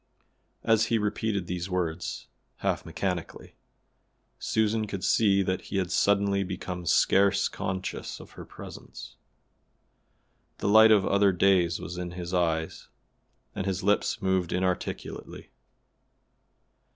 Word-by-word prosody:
As 110 -1 +3
he 115 - +2
repeated 105 -2 -1
these 90 +1 -4
words, 90 -2 -3 0.4
half - - -1
mechanically, 90 -4 -4 0.9
Susan 110 0 0
could 100 -2 -5
see 100 -3 +3
that 95 0 -2
he 100 - -3
had 95 -2 -1
suddenly 100 0 +2
become 90 -2 -6
scarce 100 +4 +3
conscious 95 0 -5
of - - -13
her - - -10
presence. - - -11 1.4
The - - -3
light 110 +2 +7
of 105 -3 +5
other 100 0 +3
days 90 -2 +2
was 90 0 -6
in 90 -1 -5
his 90 0 -6
eye 80 -2 +1 0.9
and 95 - -4
his 95 0 -2
lips 105 +1 +1
moved 95 -2 +1
inarticulately. 90 0 -3
95 Hz, 120 wpm, -27 LUFS, 90-100 Hz, 1.4 s, light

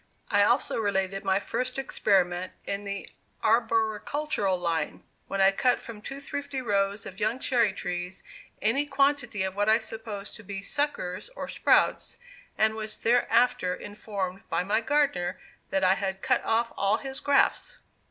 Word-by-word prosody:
I 205 - +5
also 240 +3 +2
related 195 -2 0
my 190 0 +2
first 255 +5 -3
experiment 185 -8 +1
in 200 +1 -3
the 200 0 -4 0.4
arboricultural 225 0 +1
line, 170 -2 -2 0.2
when 195 - -1
I 195 0 +7
cut 250 +5 +2
from 220 -3 -9
two 270 +6 -7
thrifty 285 -1 -4
rows 200 -3 0
of 190 - -9
young 215 +4 +1
cherry 235 -5 +2
trees 180 -1 -5 0.4
any 270 +7 +2
quantity 275 -7 +1
of 190 0 -3
what 205 +1 +2
I 220 - +6
supposed 220 -2 -6
to 210 - -13
be 195 -1 -6
"suckers," 285 - -2
or - - -5
"sprouts," - - +2 0.4
and 220 0 +3
was 215 -1 -6
thereafter 240 -4 +3
informed 200 -2 -5
by - - +1
my 210 +4 +1
gardener 230 -10 +1 0.3
that 195 - 0
I 185 0 +6
had 190 -1 -3
cut 255 -2 +2
off 230 +1 +1
all 200 +2 +2
his 265 +1 -5
grafts! 285 0 +2
210 Hz, 155 wpm, -28 LUFS, 195-245 Hz, 0.4 s, I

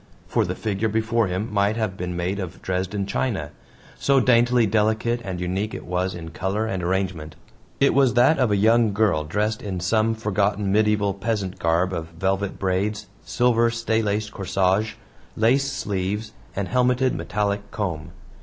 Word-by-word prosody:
For - - +1
the - - -3
figure 105 0 -1
before 110 +1 +1
him 95 +4 -3
might 100 +2 +2
have 110 -4 -1
been 90 -1 -4
made 90 +3 -2
of 95 -2 -6
Dresden 95 +2 -2
china 100 - -2 0.5
so 140 -1 +3
daintily 120 -1 +4
delicate 110 +3 +1
and 95 -4 -4
unique 95 +4 -2
it - - -8
was 90 +1 -1
in 80 -2 -7
color 95 +6 -2
and 95 -4 -2
arrangement. 90 -4 -2 0.4
It 140 - +4
was 135 -2 +3
that 130 +5 +5
of 125 -3 +3
a 105 - +2
young 110 +1 +4
girl 100 -8 +2
dressed 105 +7 -1
in 95 -3 -4
some 110 +5 +1
forgotten 105 -2 0
medieval 105 -1 +2
peasant 100 -2 -3
garb 85 +3 +1
of 80 -2 -3
velvet 95 +2 -1
braids, 100 +3 -1 0.2
silver 120 -1 +2
staylaced 110 -2 -1
corsage, 95 +2 0 0.4
lace 135 +5 +2
sleeves, 105 0 -3 0.2
and 100 -1 -2
helmeted 125 +1 +2
metallic 105 -1 -2
comb. 85 -8 -4
105 Hz, 160 wpm, -23 LUFS, 95-110 Hz, 0.5 s, that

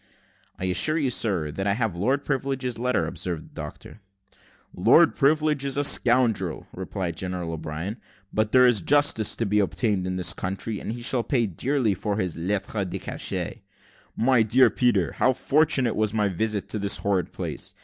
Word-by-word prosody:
"I 95 - -4
assure 95 - +1
you, 140 -5 0
sir, 95 -11 0
that 95 +6 -3
I 100 - +2
have 110 -6 -1
Lord 130 +11 0
Privilege's 135 -3 -2
letter," 125 -8 0
observed 85 0 -5
the - - -26
doctor. 105 - -9 0.7
"Lord - - +5
Privilege 150 0 +1
is 140 0 -1
a 145 - +1
scoundrel," 120 - +2
replied 95 -2 -5
General 90 -2 -4
O'Brien. 80 +6 -5 0.4
"But 110 0 0
there 130 -1 +6
is 120 -5 +4
justice 145 -4 +3
to 115 - -2
be 105 +1 +1
obtained 100 -1 0
in 95 - -3
this 90 -1 +1
country, 100 +3 -4
and - - -5
he 120 +1 -6
shall 125 0 +2
pay 120 -1 0
dearly 115 - 0
for 100 +2 -3
his 90 -5 -2
lettre 100 +4 -2
de 90 - -4
cachet. - - -4 0.5
My 125 0 +3
dear 120 +4 +4
Peter, 105 -9 +1
how 130 - +2
fortunate 135 -3 +2
was 110 -1 0
my 105 -2 +1
visit 105 +2 -1
to 110 - -1
this 100 0 +1
horrid 100 -3 -1
place! - - -5
110 Hz, 180 wpm, -25 LUFS, 95-125 Hz, 0.7 s, there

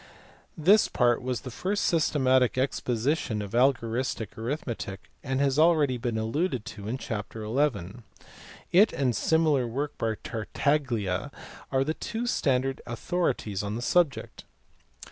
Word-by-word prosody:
This 195 +7 +5
part 120 -2 +2
was 125 -2 -2
the 125 - -7
first 195 - -1
systematic 130 -7 +2
exposition 130 -2 0
of 100 -2 -5
algoristic 120 -2 0
arithmetic 115 -5 -5
and 130 -1 -1
has 140 -1 +2
been 155 - +6
already 150 -7 +3
alluded 120 - -1
to 105 -1 -8
in 120 +4 -2
chapter 110 -2 -5
xi. 110 -5 -1 0.7
It 200 +5 +6
and 135 -3 +1
the - - -5
similar 155 -1 +2
work 140 +6 -3
by 110 -1 0
Tartaglia 115 -3 -1 0.4
are 135 0 +2
the 155 +3 -1
two 225 +7 -4
standard 135 - 0
authorities 120 - -1
on 105 +1 -3
the 120 - -4
subject. 170 -1 0
130 Hz, 135 wpm, -27 LUFS, 115-150 Hz, 0.7 s, been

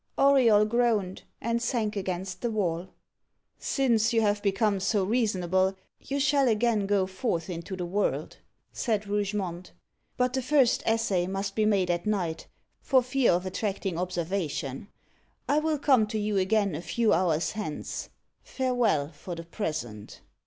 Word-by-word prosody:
Auriol 250 -7 +5
groaned, 215 -5 +1 0.2
and 235 +1 -1
sank 230 -3 -1
against 185 -1 -4
the 240 - 0
wall. 185 -5 -1 0.7
"Since 235 -5 +1
you 225 - +3
have 205 -1 +1
become 200 0 +1
so 200 +1 +1
reasonable, 190 -4 +1 0.2
you 280 +1 -3
shall 275 -1 +3
again 220 -2 +2
go 200 -2 +2
forth 185 -2 -2
into 170 +2 -5
the 180 -1 -4
world," 200 +4 -1 0.4
said 215 -4 -1
Rougemont; 200 -3 -3 0.4
"but 250 0 +1
the 265 - 0
first 260 -1 +3
essay 205 -6 +1
must 195 +1 -3
be 215 -1 +2
made 190 -4 +2
at 175 +3 -2
night, 175 -6 -1 0.3
for 260 -2 +3
fear 255 0 +2
of 180 +2 0
attracting 190 -2 -2
observation. 175 -4 -3 0.6
I 290 - +3
will 310 0 0
come 265 -6 +3
to 220 +1 -3
you 210 0 -1
again 200 0 +2
a 150 - -4
few 215 +6 +1
hours 165 -2 +1
hence. 210 -9 -5 0.3
Farewell 235 - 0
for 175 0 -8
the 165 - -7
present." 150 - -5
205 Hz, 150 wpm, -27 LUFS, 180-230 Hz, 0.7 s, Auriol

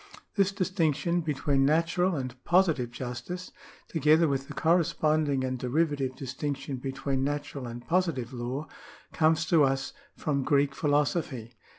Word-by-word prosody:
This 195 -1 +2
distinction 175 -3 0
between 140 -3 +1
natural 165 +5 +2
and 130 -3 -3
positive 165 -9 +3
justice, 125 +9 -6 0.4
together 160 +1 +4
with 135 -1 -1
the - - -8
corresponding 155 -4 +2
and 130 -1 -2
derivative 140 0 0
distinction 135 +1 -4
between 135 +1 -2
natural 145 -2 -3
and 120 +1 -8
positive 165 -9 0
law, 125 +4 -4 0.5
comes 160 +1 +3
to 160 -2 +4
us 135 - 0 0.2
from 145 -3 0
Greek 140 0 +2
philosophy. 145 - 0
145 Hz, 125 wpm, -28 LUFS, 130-165 Hz, 0.5 s, together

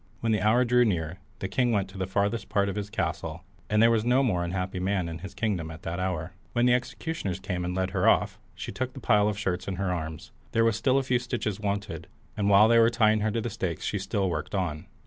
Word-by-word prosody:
When 115 - +1
the 105 - +2
hour 120 +4 +4
drew 125 +1 +4
near, 90 -5 -1 0.2
the 95 - -3
king 120 +5 +1
went 100 -3 +1
to 95 - -11
the 95 - -1
farthest 100 +4 -1
part 100 -2 +1
of 100 - -4
his 105 -1 -4
palace, 95 -6 -2 0.5
and 105 +1 +4
there 115 - +6
was 110 -2 +2
no 125 +3 +3
more 90 -9 +1
unhappy 90 +1 -3
man 95 -1 0
in 85 -1 -6
his 100 +3 -9
kingdom 95 -8 -1
at 80 +3 -10
that 85 +2 -3
hour. 90 -2 -2 0.2
When 120 0 +2
the 125 - +5
executioners 125 - -2
came 95 -2 -3
and 90 +1 -3
led 95 0 -1
her 95 -2 +3
off, - - +2 0.2
she - - -6
took 130 -1 -3
the - - -8
pile 105 -4 +3
of 105 -2 -1
shirts 95 -3 -2
in 95 - -2
her 95 0 -1
arms. 80 -2 -5 0.2
There 115 0 +3
was 115 -2 +3
still 130 +4 +2
a 135 - +2
few 125 -2 +1
stitches 120 -5 -3
wanted, 100 -1 -3 0.3
and 100 -1 +1
while 100 +2 +7
they 115 0 +5
were 115 0 +6
tying 110 -2 +3
her 110 +1 +1
to 115 +2 -1
the 115 - -3
stakes 90 -3 -3
she 100 - -1
still 95 0 -1
worked 80 +2 -3
on. 85 -6 -2
100 Hz, 260 wpm, -27 LUFS, 90-115 Hz, 0.5 s, while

